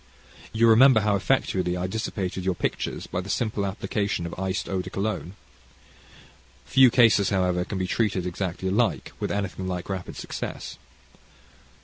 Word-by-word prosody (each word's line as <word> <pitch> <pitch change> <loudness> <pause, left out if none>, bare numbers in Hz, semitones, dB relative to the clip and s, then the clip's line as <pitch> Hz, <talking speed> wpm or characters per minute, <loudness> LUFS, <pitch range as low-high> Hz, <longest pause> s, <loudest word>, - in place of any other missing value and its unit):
You 115 +1 +3
remember 115 +1 +7
how 105 -1 +2
effectually 95 -5 0
I 90 - -2
dissipated 95 -2 -3
your 95 -1 0
pictures - - -3
by 90 - -3
the 95 - -9
simple 110 -3 -1
application 100 -2 -2
of 85 - -6
iced 95 0 -2
eau 95 -1 -1
de - - -8
cologne. 100 -3 -3 1.3
Few 130 -1 +6
cases, 115 -5 +4
however, 90 -2 +1
can 95 - -5
be 95 - -1
treated 95 -2 0
exactly 90 +1 -3
alike 110 +4 0
with - - -2
anything 95 -2 -3
like 90 0 -4
rapid 95 -2 -5
success. - - -6
95 Hz, 150 wpm, -25 LUFS, 90-110 Hz, 1.3 s, remember